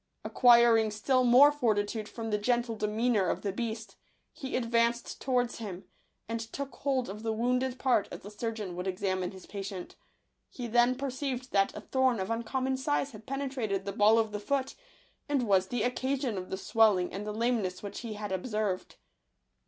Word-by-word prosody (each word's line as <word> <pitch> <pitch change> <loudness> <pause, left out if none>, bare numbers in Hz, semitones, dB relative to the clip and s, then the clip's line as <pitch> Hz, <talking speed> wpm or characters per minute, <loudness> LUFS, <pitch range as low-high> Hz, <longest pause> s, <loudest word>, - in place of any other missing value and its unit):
Acquiring 235 -3 +5
still 255 +5 +1
more 255 +4 +7
fortitude 215 -5 -1
from 225 -1 -5
the 210 - +1
gentle 240 +1 0
demeanour 215 -1 +1
of - - -2
the 200 - -1
beast, 220 -1 -5 0.4
he 265 -1 -5
advanced 235 -1 0
towards 245 -3 0
him, 195 -4 -6 0.4
and 230 +1 -2
took 270 +5 -6
hold 265 -3 0
of 205 +3 -7
the 225 0 -1
wounded 250 +3 0
part 250 -6 +2
as - - -9
a 205 - -8
surgeon 210 -3 -4
would 180 +2 -4
examine 185 -1 -1
his 190 -1 -12
patient. 195 -2 -7 0.5
He 245 - -7
then 240 +2 +3
perceived 260 -1 -4
that 195 -1 +2
a - - -6
thorn 260 -4 +1
of 190 +3 -3
uncommon 260 +3 -1
size 280 +1 0
had 220 -2 -13
penetrated 260 -8 -2
the 200 - -2
ball 210 +3 +5
of 220 -1 +1
the 210 - -3
foot, 270 +5 -1 0.6
and 280 -3 +1
was 190 -2 +3
the 235 +1 -1
occasion 260 -1 -1
of 185 -1 -5
the 190 - -3
swelling 205 -3 +3
and 195 +2 -4
the 210 - -4
lameness 215 -5 -1
which 200 - -6
he 230 -3 -5
had 210 -2 -5
ob 190 +5 -3
served. 210 -5 -2
225 Hz, 185 wpm, -30 LUFS, 205-250 Hz, 0.6 s, more